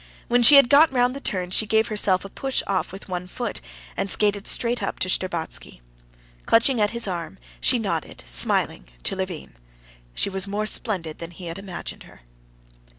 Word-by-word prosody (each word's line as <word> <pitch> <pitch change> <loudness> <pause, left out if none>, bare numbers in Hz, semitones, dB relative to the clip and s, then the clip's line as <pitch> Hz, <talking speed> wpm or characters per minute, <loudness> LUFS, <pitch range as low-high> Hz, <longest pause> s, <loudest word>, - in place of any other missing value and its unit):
When 245 +1 +3
she 285 +5 +9
had 275 -3 +8
got 290 +4 +6
round 250 0 +1
the - - -5
turn, 180 -6 -2
she 215 +3 +2
gave 220 +2 +2
herself 200 -3 +1
a - - -7
push 270 +6 -2
off 195 -2 -2
with 195 +2 -10
one 180 -1 -4
foot, 65 - -5 0.3
and 195 - -2
skated 205 0 +1
straight 240 0 0
up - - -3
to - - 0
Shtcherbatsky. 175 - -2 0.7
Clutching 230 +1 +3
at 205 - +3
his 235 -1 0
arm, 175 -3 -5 0.2
she - - +4
nodded - - -4
smiling - - +1 0.2
to - - +1
Levin. 185 -4 -6 0.6
She - - +1
was 190 0 -1
more 205 +2 -2
splendid 185 -8 -2
than 170 - -6
he 175 +1 -11
had 170 +2 -6
imagined 195 -3 -8
her. - - -18
195 Hz, 185 wpm, -23 LUFS, 180-230 Hz, 0.7 s, she